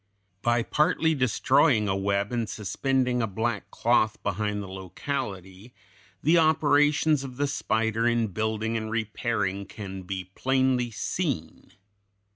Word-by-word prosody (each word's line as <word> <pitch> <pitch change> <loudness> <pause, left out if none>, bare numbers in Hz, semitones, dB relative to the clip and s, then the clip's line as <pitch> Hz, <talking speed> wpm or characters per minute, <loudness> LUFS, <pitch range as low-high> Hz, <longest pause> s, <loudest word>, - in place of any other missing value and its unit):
By 120 +1 +2
partly 160 +3 +2
destroying 115 -4 +3
a 95 - +1
web 100 +1 0
and 115 -2 -1
suspending 125 +4 0
a 115 - 0
black 110 +4 -2
cloth 110 -2 +2
behind 105 +1 -1
the - - -8
locality, 95 +1 -6 0.5
the 165 +4 +5
operations 150 -1 +3
of 130 -2 -8
the 145 - +1
spider 115 -4 0
in 120 -2 +1
building 110 +2 -2
and 110 -1 -2
repairing 110 -3 -2
can 95 -3 -7
be 95 0 -6
plainly 130 -1 +1
seen. 115 - -4
115 Hz, 125 wpm, -26 LUFS, 100-130 Hz, 0.5 s, the